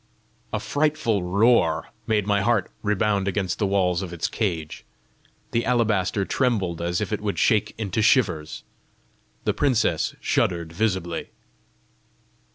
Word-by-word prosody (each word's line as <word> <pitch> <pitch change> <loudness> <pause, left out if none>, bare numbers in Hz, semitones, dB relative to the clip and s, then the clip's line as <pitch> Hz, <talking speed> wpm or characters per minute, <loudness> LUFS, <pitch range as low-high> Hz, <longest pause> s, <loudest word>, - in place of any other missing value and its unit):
A 110 - -1
frightful 145 -2 0
roar 90 -3 +2 0.2
made 105 -3 +1
my 100 -1 +2
heart 110 -1 +1
rebound 105 -1 +1
against 95 -2 -1
the 105 - +1
walls 95 -2 +1
of 95 -3 -5
its 85 -2 -2
cage. 85 -8 -3 0.7
The 115 - +1
alabaster 105 -5 +1
trembled 95 -11 0
as 85 +1 -1
if - - -2
it 105 - -2
would 105 -1 -2
shake 105 -1 +2
into 110 -1 -1
shivers. 90 - +1 0.8
The - - +1
princess 130 -6 +1
shuddered 85 -2 0
visibly. 90 -4 -1
100 Hz, 130 wpm, -24 LUFS, 90-110 Hz, 0.8 s, roar